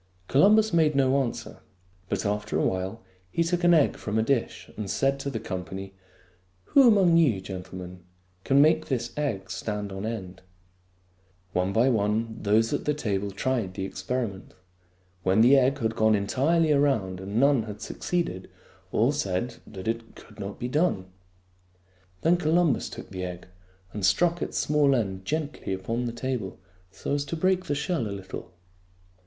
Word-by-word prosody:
Columbus 210 Hz, +8 st, +5 dB
made 155 Hz, -3 st, +3 dB
no 135 Hz, 0 st, +3 dB
answer; 120 Hz, -3 st, -5 dB, 0.5 s
but 100 Hz, 0 st, -2 dB
after 105 Hz, +1 st, -1 dB
a -, -, +1 dB
while 95 Hz, +4 st, -2 dB, 0.3 s
he 170 Hz, -, +1 dB
took 175 Hz, +1 st, -1 dB
an 175 Hz, 0 st, +6 dB
egg 155 Hz, -, +3 dB
from 105 Hz, +1 st, -3 dB
a 110 Hz, -, +3 dB
dish 125 Hz, -1 st, -1 dB
and 105 Hz, -2 st, -5 dB
said 135 Hz, +7 st, +1 dB
to 140 Hz, -, -3 dB
the 120 Hz, -5 st, -3 dB
company, 95 Hz, -1 st, -6 dB, 0.4 s
" 90 Hz, 0 st, -38 dB
Who 275 Hz, -3 st, +8 dB
among 190 Hz, -7 st, +5 dB
you, 135 Hz, -12 st, +3 dB
gentlemen, 90 Hz, -1 st, -8 dB, 0.4 s
can 140 Hz, +1 st, +5 dB
make 155 Hz, +1 st, +3 dB
this 120 Hz, -3 st, -2 dB
egg 110 Hz, -11 st, -2 dB
stand 105 Hz, 0 st, -4 dB
on 95 Hz, +3 st, -4 dB
end? 95 Hz, -5 st, -6 dB, 0.6 s
" 90 Hz, 0 st, -38 dB
One 90 Hz, +1 st, +1 dB
by 115 Hz, +6 st, +3 dB
one 110 Hz, 0 st, 0 dB
those 110 Hz, +4 st, +2 dB
at 145 Hz, -, -2 dB
the 150 Hz, -, +1 dB
table 100 Hz, -7 st, -2 dB
tried 100 Hz, -1 st, -2 dB
the 95 Hz, 0 st, -3 dB
experi 115 Hz, +4 st, -2 dB
ment. 95 Hz, 0 st, -14 dB, 0.7 s
When 95 Hz, +4 st, +3 dB
the 125 Hz, +4 st, +7 dB
egg 135 Hz, +1 st, +3 dB
had 115 Hz, -3 st, -1 dB
gone 110 Hz, -1 st, +4 dB
entirely 150 Hz, +11 st, +2 dB
around 130 Hz, -11 st, +1 dB
and 100 Hz, +4 st, -2 dB
none 140 Hz, -2 st, +4 dB
had 105 Hz, 0 st, -7 dB
succeeded, 140 Hz, -, -3 dB, 0.4 s
all 115 Hz, +5 st, +3 dB
said 115 Hz, -3 st, -2 dB
that 95 Hz, -2 st, -8 dB
it 115 Hz, 0 st, -3 dB
could 105 Hz, -1 st, -15 dB
not 100 Hz, 0 st, -5 dB
be 120 Hz, -, -3 dB
done. 125 Hz, -, 0 dB, 1.1 s
Then 170 Hz, +2 st, +4 dB
Columbus 165 Hz, -2 st, +2 dB
took -, -, -10 dB
the 95 Hz, -1 st, -5 dB
egg 90 Hz, -1 st, -6 dB, 0.5 s
and 105 Hz, -, -5 dB
struck 170 Hz, -, +3 dB
its -, -, -3 dB
small 145 Hz, -2 st, +3 dB
end 95 Hz, -5 st, -2 dB
gently 150 Hz, -8 st, -3 dB
upon 115 Hz, +6 st, -2 dB
the 120 Hz, -, -2 dB
table 120 Hz, -5 st, -4 dB, 0.3 s
so 95 Hz, -, -4 dB
as 145 Hz, 0 st, 0 dB
to 165 Hz, -, -4 dB
break 185 Hz, +2 st, +1 dB
the 145 Hz, -, -1 dB
shell 165 Hz, +2 st, -1 dB
a -, -, -5 dB
little. 95 Hz, -1 st, -7 dB
115 Hz, 175 wpm, -26 LUFS, 95-145 Hz, 1.1 s, Who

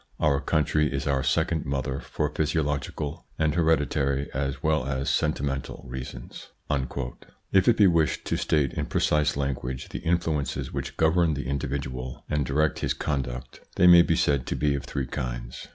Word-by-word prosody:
Our 70 Hz, -2 st, +2 dB
country 75 Hz, 0 st, +1 dB
is 70 Hz, 0 st, -2 dB
our 70 Hz, -1 st, +1 dB
second 80 Hz, +3 st, 0 dB
mother 70 Hz, 0 st, -2 dB
for -, -, -2 dB
physiological 75 Hz, -2 st, -2 dB
and 80 Hz, -1 st, +2 dB
hereditary 75 Hz, -4 st, +1 dB
as 70 Hz, 0 st, -2 dB
well 75 Hz, -4 st, +1 dB
as 70 Hz, 0 st, -1 dB
sentimental 70 Hz, -3 st, -1 dB
reasons." 65 Hz, -1 st, -8 dB, 1.0 s
If 95 Hz, -1 st, +4 dB
it 120 Hz, -, +5 dB
be 105 Hz, -, +6 dB
wished 85 Hz, -4 st, +2 dB
to -, -, 0 dB
state 70 Hz, -5 st, +1 dB
in -, -, -2 dB
precise 75 Hz, -2 st, +1 dB
language 65 Hz, -2 st, -3 dB
the -, -, -6 dB
in 85 Hz, 0 st, +3 dB
fluences 70 Hz, -5 st, -2 dB
which -, -, -4 dB
govern 80 Hz, 0 st, +3 dB
the 70 Hz, -, -4 dB
individual 65 Hz, -2 st, -4 dB
and 75 Hz, -3 st, 0 dB
direct 75 Hz, +2 st, +1 dB
his -, -, -1 dB
conduct, 65 Hz, -4 st, -3 dB, 0.2 s
they 90 Hz, -, +4 dB
may 85 Hz, -1 st, +9 dB
be 85 Hz, -1 st, +2 dB
said 70 Hz, -5 st, +1 dB
to -, -, -1 dB
be 75 Hz, -1 st, +1 dB
of 70 Hz, -, -3 dB
three 70 Hz, -2 st, -3 dB
kinds. -, -, -5 dB
70 Hz, 170 wpm, -26 LUFS, 65-80 Hz, 1.0 s, may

